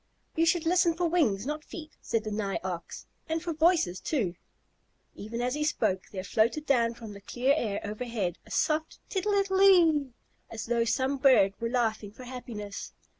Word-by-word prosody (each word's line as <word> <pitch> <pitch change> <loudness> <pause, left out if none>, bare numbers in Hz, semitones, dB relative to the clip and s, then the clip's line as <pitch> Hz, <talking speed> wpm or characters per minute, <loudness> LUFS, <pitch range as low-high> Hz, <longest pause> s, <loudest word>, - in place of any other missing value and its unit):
"You 330 +1 +2
should 340 -1 +2
listen 345 0 +3
for 345 0 +1
wings, 255 - +1
not 300 +2 -3
feet," 315 -2 -9
said 225 -2 -1
the 215 - -4
Nigh 205 -2 -2
Ox, 180 -2 -6 0.2
"and 320 +1 0
for 340 -2 -2
voices, 315 - +2
too." 210 - -1 0.8
Even 230 +3 -6
as 250 +1 0
he 300 +1 -1
spoke 215 -11 0
there 185 -2 -5
floated 230 +10 +1
down 235 -5 +2
from 225 -3 -9
the 200 - -11
clear 250 +6 +1
air 215 -9 -1
overhead 210 -4 -3
a - - -18
soft 310 0 0
"tittle 405 +1 0
ittle 390 -1 +1
ittle 355 -6 +6
ee," 250 - -25 0.4
as 220 - -6
though 235 0 +1
some 260 +4 0
bird 255 -8 +5
were 230 - -1
laughing 225 -4 -1
for 255 - -12
happiness. 235 -5 -7
250 Hz, 185 wpm, -29 LUFS, 215-315 Hz, 0.8 s, ittle